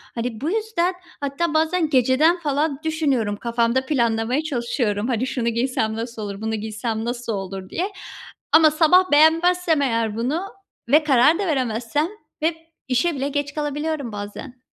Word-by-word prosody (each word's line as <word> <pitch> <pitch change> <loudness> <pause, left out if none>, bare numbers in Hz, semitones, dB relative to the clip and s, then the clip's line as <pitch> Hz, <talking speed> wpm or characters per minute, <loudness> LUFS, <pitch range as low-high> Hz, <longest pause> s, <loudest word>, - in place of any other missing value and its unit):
Hani, 230 -2 -4
bu 300 - -1
yüzden 425 -5 0 0.3
hatta 285 +4 -1
bazen 320 +1 +1
geceden 275 +6 +3
falan 290 -2 -1
düşünüyorum. 275 -10 0
Kafamda 235 +2 0
planlamaya 240 0 0
çalışıyorum, 235 -6 -1
hani, 250 0 0
"Şunu 240 -2 -1
giysem 235 -2 -1
nasıl 230 0 -5
olur, 200 -1 -6
bunu 220 0 -2
giysem 220 +1 -3
nasıl 240 -1 -3
olur?" 195 -1 -6
diye 375 +4 -2 0.6
ama 315 -1 +7
sabah 355 +4 +4
beğenmezsem 325 +1 +4
eğer 230 -5 0
bunu 265 +9 -1 0.5
ve 300 +4 +5
karar 295 +4 +4
da 400 - -1
veremezsem, 255 0 0 0.3
hep, 320 +1 +1 0.3
işe 280 +7 +1
bile 275 +1 -2
geç 285 0 -2
kalabiliyorum 295 -3 -3
bazen. 210 +5 -8
265 Hz, 145 wpm, -22 LUFS, 230-315 Hz, 0.6 s, ama